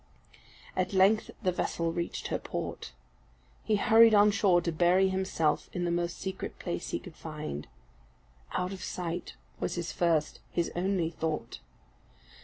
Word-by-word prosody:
At 185 +1 0
length 195 +3 +4
the 185 - +3
vessel 170 -1 -1
reached 170 0 -3
her - - -1
port. - - -5 0.7
He 215 - +2
hurried 225 +2 +6
on 205 0 +6
shore 200 -4 +4
to 170 - -1
bury 180 +4 +4
himself 190 -5 0
in 175 -1 -1
the 170 - 0
most 175 0 -1
secret 190 -1 -5
place 175 -1 -4
he - - -1
could 175 -4 -11
find. 150 - -6 0.9
Out 180 +1 -1
of 190 - -8
sight 175 -1 -4 0.2
was 175 - -2
his 175 -1 -3
first, 165 -3 +1
his 170 - -1
only 175 -2 0
thought. 155 -8 -3
175 Hz, 150 wpm, -30 LUFS, 165-190 Hz, 0.9 s, hurried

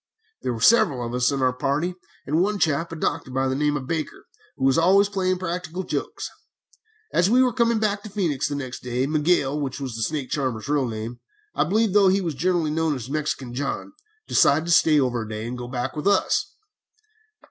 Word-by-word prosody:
"There 125 - -2
were - - -6
several 155 - +4
of 115 - -5
us 125 +2 +2
in 140 -1 -2
the 130 -1 +2
party, 145 +7 -1 0.3
and 155 +4 +1
one 205 +2 +1
chap, 165 -2 0
a - - -5
doctor 155 - -2
by 130 +1 0
the 130 - 0
name 150 +1 +1
of 135 - -6
Baker, 160 +2 -4 0.3
who 135 - -1
was 135 - +4
always 190 +5 +5
playing 185 -2 0
practical 180 0 -4
jokes. - - -4 0.9
As 175 +3 +3
we 250 +3 +5
were 250 -2 +1
coming 235 -1 +2
back 210 -2 0
to 215 - -9
Phœnix, 160 -9 -1
the 145 - -3
next 130 -3 -5
day, 125 +1 -1
Miguel, 150 -1 +1
which 135 -1 -4
was 130 -5 -5
the 115 - -5
snake 135 +3 -2
charmer's 130 -6 -2
real 145 -3 +1
name, 115 +2 -6 0.3
I - - +1
believe, 215 +6 +2
although 200 -2 +6
he 190 +1 +3
was 170 -5 -2
generally 170 +1 0
known 160 -1 0
as 130 0 -7
Mexican 145 -5 -3
John, 140 - -4 0.3
decided 150 +3 +4
to 170 - -1
stay 155 -3 +5
over 125 -3 0
a 110 - -7
day 110 +1 -5
and 125 - -4
go 125 -1 -6
back 125 +2 -3
with 150 +4 -2
us. 205 - +2
150 Hz, 215 wpm, -24 LUFS, 130-180 Hz, 0.9 s, although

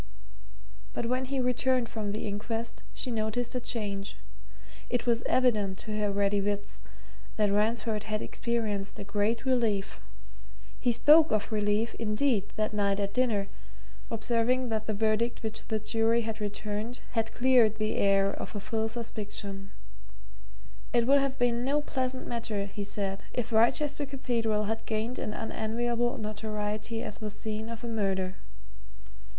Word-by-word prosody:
But - - -2
when 255 +2 0
he 270 +1 -2
returned 250 0 +2
from 215 -3 -3
the 210 - -3
inquest 225 +3 -3
she 250 - -4
noticed 230 +2 -1
a 250 - 0
change 205 -5 -3 0.7
it 245 -1 0
was 235 -1 +3
evident, 210 -7 +2
to 215 - -4
her 210 -1 +1
ready 200 0 +2
wits, 205 0 -2 0.5
that 210 -2 +2
Ransford 215 +1 +1
had 215 -1 -1
experienced 215 -5 -2
a - - -4
great 205 +4 0
relief. 220 -6 +1 0.8
He 245 - +2
spoke 300 +7 +7
of 215 0 0
relief, 210 +1 +1
indeed, 215 -1 +1
that 215 0 0
night 200 -1 +1
at 200 0 -1
dinner, 225 -6 +2 0.6
observing 235 +3 +1
that 220 -1 -2
the 215 - 0
verdict 220 +3 +1
which 220 0 -4
the 220 -1 0
jury 225 +2 +2
had 220 -1 -4
returned 210 +3 -3
had 225 -2 0
cleared 245 -4 +5
the 215 0 -1
air 195 0 +4
of - - -6
a - - -1
foul 220 +2 -1
suspicion; 205 -3 -3 1.2
it 240 -1 +4
would 280 +3 +6
have 275 -1 -1
been 245 -1 +2
no 280 +3 +2
pleasant 260 -3 -2
matter, 225 -4 -2
he 200 +1 -5
said, 200 -1 -2
if 235 -1 -1
Wrychester 285 +6 +3
Cathedral 235 -6 0
had 225 +2 -3
gained 225 +3 -1
an - - -2
unenviable 235 +3 -1
notoriety 215 +1 -3
as 210 - -5
the 215 -1 -3
scene 215 +1 -3
of 230 0 -7
a - - -3
murder. 195 -4 -1
220 Hz, 150 wpm, -30 LUFS, 210-240 Hz, 1.2 s, spoke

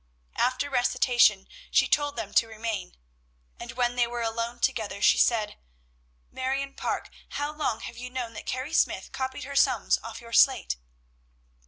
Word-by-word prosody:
After 255 +3 +1
recitation, 245 -5 +3 0.2
she - - +4
told 290 -1 +1
them 205 0 -5
to 230 - +4
remain, 220 - -4 0.6
and - - -7
when 245 -1 0
they 240 -1 +2
were 240 0 -3
alone 230 +1 -2
together 215 -4 -1
she - - +5
said, 215 -3 +2 0.7
"Marion 270 +1 -2
Parke! - - -3 0.2
how 290 +1 -2
long 300 -7 -1
have 235 - -8
you 250 0 -6
known 250 -2 -4
that 210 - -9
Carrie 260 +5 -3
Smyth - - +1
copied 260 +1 -4
her 280 +1 -7
sums 275 - +3
off - - -8
your 230 -1 -12
slate?" 260 - +4
245 Hz, 160 wpm, -27 LUFS, 230-265 Hz, 0.7 s, she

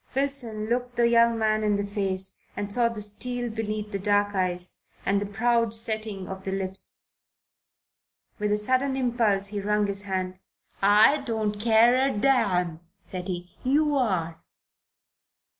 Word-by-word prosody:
Wilson 265 -6 +1
looked 245 +2 -2
the 235 -1 +3
young 235 0 +4
man 215 -1 +1
in 210 -1 +2
the 200 0 -1
face 190 -2 -1 0.2
and 205 0 -3
saw 235 0 +3
the 220 -2 -4
steel 245 +3 -2
beneath 215 -1 -4
the 200 - -3
dark 205 +1 +1
eyes, 180 -2 -2 0.3
and 200 +1 +1
the 205 - -3
Proud 230 +2 +1
setting 215 -4 -2
of 190 0 -7
the 195 - -3
lips. 190 0 -3 1.4
With 210 0 0
a 210 - +2
sudden 260 +5 0
impulse 230 -6 +1
he 205 -1 -4
wrung 210 +1 +1
his 200 0 -2
hand. 185 -2 -3 0.4
"I 210 +8 +6
don't 220 -5 -2
care 235 +3 +4
a 235 - -3
damn!" 185 -10 +1 0.3
said 180 -1 -6
he. 175 -1 -6
"You 290 +3 +2
are." 185 -11 -1
210 Hz, 155 wpm, -26 LUFS, 195-235 Hz, 1.4 s, I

